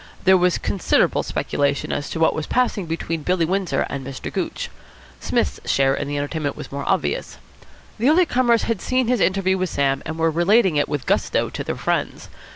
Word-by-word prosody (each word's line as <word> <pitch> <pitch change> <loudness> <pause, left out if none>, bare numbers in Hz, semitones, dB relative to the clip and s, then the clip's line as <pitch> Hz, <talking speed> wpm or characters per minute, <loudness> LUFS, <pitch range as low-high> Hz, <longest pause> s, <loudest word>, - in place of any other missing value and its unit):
There 190 0 +6
was 180 -1 +3
considerable 195 - +1
speculation 140 0 -1
as 145 - -3
to 165 - -4
what 160 - +4
was 155 - -4
passing 235 -7 0
between 165 0 -3
Billy 180 +1 +1
Windsor 180 -5 0
and 140 -1 -5
Mr. 135 0 -7
Gooch. - - -3 0.5
Psmith's - - -1
share 135 0 +3
in 145 - -3
the 145 0 -3
entertainment 145 0 -3
was - - -8
more 140 0 -4
obvious. 315 - -1 0.6
The 245 +5 +3
early 350 +4 +5
comers 245 -5 +2
had 230 -5 -1
seen 255 -1 0
his 250 -2 +2
interview 190 -1 +1
with 185 -1 -1
Sam, 135 -2 0
and 160 +1 -5
were 165 0 +2
relating 185 +2 +3
it 145 - +1
with 145 -3 -3
gusto - - 0
to - - -4
their - - -3
friends. - - -2
170 Hz, 195 wpm, -22 LUFS, 145-200 Hz, 0.6 s, There